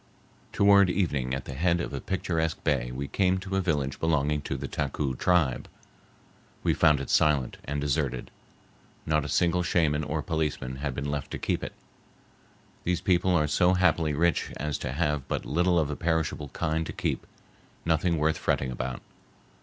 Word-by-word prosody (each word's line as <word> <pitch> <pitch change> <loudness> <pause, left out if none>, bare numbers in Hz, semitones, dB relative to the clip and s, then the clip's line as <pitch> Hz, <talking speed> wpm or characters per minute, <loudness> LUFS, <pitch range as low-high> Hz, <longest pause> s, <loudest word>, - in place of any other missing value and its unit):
Toward 100 -2 +5
evening 75 -9 0
at 65 - -6
the 70 - -6
head 85 +5 +1
of 85 - -4
a 70 - -4
picturesque 80 -4 -2
bay - - +1
we 70 +3 -4
came 95 +2 +1
to 95 +1 -4
a 95 - +2
village 75 -7 -1
belonging 75 -2 +1
to 70 - -4
the 70 +1 -5
Taku 70 -1 -2
tribe. 80 -4 +1 1.0
We - - +3
found 75 -2 +4
it 70 - -4
silent 70 -5 +2
and 70 +1 -2
deserted. 70 -3 -1 0.7
Not 75 -2 +1
a - - -5
single 90 0 +2
shaman 80 -4 +1
or 75 0 -2
policeman 75 -6 -2
had 70 -1 -3
been 70 +1 -3
left 70 -2 -3
to - - -2
keep - - -1
it. - - -5 1.1
These 90 0 0
people 90 -1 +2
are 75 -3 +3
so 90 +5 +3
happily 85 -4 +2
rich 85 +2 +1
as 75 -1 -2
to 65 - -3
have 75 -1 -1
but - - -2
little 85 +4 +2
of 75 -3 +1
a - - -3
perishable 80 -3 -1
kind 80 +4 -1
to - - -5
keep, - - -2 0.6
nothing 85 +1 +2
worth 80 +1 +1
fretting 65 -1 0
about. 60 +1 -4
75 Hz, 175 wpm, -27 LUFS, 70-85 Hz, 1.1 s, Toward